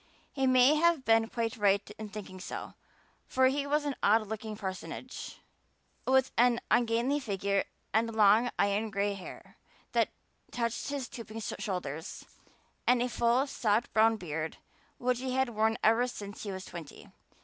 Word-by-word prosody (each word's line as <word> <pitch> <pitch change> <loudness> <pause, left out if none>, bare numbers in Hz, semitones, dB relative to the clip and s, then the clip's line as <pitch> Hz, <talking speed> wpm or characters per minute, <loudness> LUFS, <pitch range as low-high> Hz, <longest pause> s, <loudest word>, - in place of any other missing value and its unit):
He 270 -2 +1
may 255 +2 +6
have 335 -3 +3
been 225 0 +4
quite 230 +1 -2
right 200 -1 +2
in 215 -1 -6
thinking 200 -3 -8
so, 185 - -6 0.5
for 260 0 +4
he 280 +1 -1
was 295 +1 +1
an 285 -2 -1
odd 215 +1 +4
looking 215 0 -5
personage, 195 +6 -6 0.7
with 265 0 +3
an 240 -1 +5
ungainly 240 +4 +2
figure 200 -5 -1 0.3
and 225 +1 +1
long 215 +3 +5
iron 205 +2 +1
gray 200 -1 0
hair 195 -2 -10 0.3
that - - +2 0.4
touched 235 -1 -2
his 280 -2 -3
stooping 225 -2 -8
shoulders, 180 -8 -4 0.6
and 250 0 +5
a 250 - -1
full, 240 +3 +2
soft 225 -4 0
brown 220 +1 +4
beard 160 -3 -4 0.4
which 250 0 0
he 260 0 -3
had 265 -1 +2
worn 220 0 +1
ever 225 +3 +4
since 205 -4 -7
he 205 - -4
was 190 0 -6
twenty. 165 -4 -10
225 Hz, 155 wpm, -30 LUFS, 205-250 Hz, 0.7 s, may